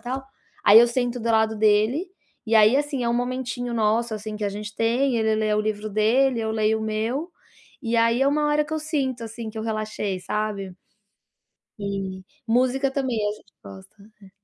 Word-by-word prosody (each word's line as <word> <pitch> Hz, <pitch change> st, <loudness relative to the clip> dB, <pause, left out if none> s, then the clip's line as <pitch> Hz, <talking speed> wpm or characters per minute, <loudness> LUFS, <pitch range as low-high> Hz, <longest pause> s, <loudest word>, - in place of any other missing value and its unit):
tal, 260 Hz, +2 st, -5 dB, 0.4 s
aí 205 Hz, +2 st, +9 dB
eu 240 Hz, -, +6 dB
sento 245 Hz, 0 st, -2 dB
do 230 Hz, +1 st, -1 dB
lado 220 Hz, 0 st, +2 dB
dele, 215 Hz, -, +2 dB, 0.4 s
e 225 Hz, -, +1 dB
aí 220 Hz, +4 st, +6 dB
assim, 285 Hz, -3 st, -2 dB
é -, -, +1 dB
um 235 Hz, -, +1 dB
momentinho 245 Hz, -1 st, -3 dB
nosso 220 Hz, +1 st, +1 dB
assim 215 Hz, 0 st, -6 dB
que 210 Hz, -, -4 dB
a 205 Hz, -, +1 dB
gente 210 Hz, +1 st, -7 dB
tem, 240 Hz, +2 st, +1 dB
ele 220 Hz, -1 st, +1 dB
lê 215 Hz, 0 st, 0 dB
o 210 Hz, -, +2 dB
livro 215 Hz, 0 st, -3 dB
dele, 230 Hz, +4 st, +2 dB
eu 220 Hz, 0 st, -2 dB
leio 220 Hz, 0 st, +1 dB
o -, -, -4 dB
meu, 225 Hz, +9 st, -2 dB, 0.6 s
e 230 Hz, 0 st, 0 dB
aí 230 Hz, +2 st, +3 dB
é 275 Hz, -, +4 dB
uma 295 Hz, +1 st, +1 dB
hora 295 Hz, 0 st, +2 dB
que 295 Hz, -, -9 dB
eu 315 Hz, -, 0 dB
sinto 270 Hz, -6 st, -2 dB
assim 225 Hz, 0 st, -7 dB
que 220 Hz, -, -8 dB
eu 220 Hz, -, -3 dB
relaxei, 215 Hz, -3 st, -3 dB
sabe. 200 Hz, 0 st, -3 dB, 1.1 s
E, 195 Hz, -2 st, -4 dB, 0.2 s
música 255 Hz, +3 st, +2 dB
também 265 Hz, -4 st, -1 dB
a -, -, -1 dB
gente 210 Hz, -, -16 dB
gosta, 95 Hz, -, -13 dB, 0.3 s
é. 195 Hz, -, -15 dB
225 Hz, 200 wpm, -24 LUFS, 215-255 Hz, 1.1 s, aí